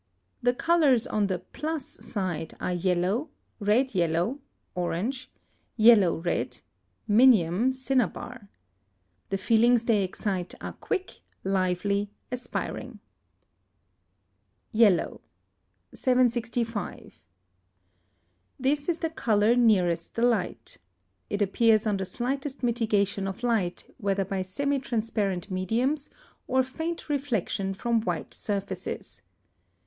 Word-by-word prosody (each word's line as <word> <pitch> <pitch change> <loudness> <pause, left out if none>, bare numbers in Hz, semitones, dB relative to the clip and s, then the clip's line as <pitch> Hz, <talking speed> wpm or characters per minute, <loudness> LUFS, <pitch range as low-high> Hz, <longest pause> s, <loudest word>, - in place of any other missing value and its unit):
The 245 0 +2
colours 300 -7 +3
on 210 -1 0
the 185 -2 -1
plus 300 - -4
side 185 -7 -4
are 180 - -1
yellow, 185 - 0 0.3
red 225 +5 +2
yellow 175 - +1 0.3
(orange), 210 +9 -2 0.5
yellow 215 -6 +6
red 170 +1 -2 0.5
(minium, 220 -1 +5
cinnabar). 250 -3 -2 0.8
The 195 - 0
feelings 230 +4 +3
they 215 -4 +3
excite 185 -1 -3
are - - -6
quick, 375 0 -4 0.2
lively, 195 +2 0 0.2
aspiring. 250 0 -5 1.7
YELLOW. 215 -6 +3 0.7
765. 240 -3 0 1.4
This 285 +4 +1
is 335 - +1
the 325 - -2
colour 220 -5 +2
nearest 185 -8 +2
the 230 - 0
light. 215 - 0 0.5
It 205 0 +1
appears 215 +2 +3
on 210 -2 +1
the 190 - -3
slightest 265 +7 -3
mitigation 210 -5 +1
of 195 +5 -6
light, 220 -8 -1
whether 195 -1 0
by 195 0 -2
semi 280 +10 -1
transparent 215 -6 -2
mediums 240 - 0 0.4
or 260 +1 +3
faint 320 +6 -5
reflection 225 - -1
from 235 +2 +1
white 175 -7 -3
surfaces. 200 -1 -4
220 Hz, 100 wpm, -27 LUFS, 190-250 Hz, 1.7 s, yellow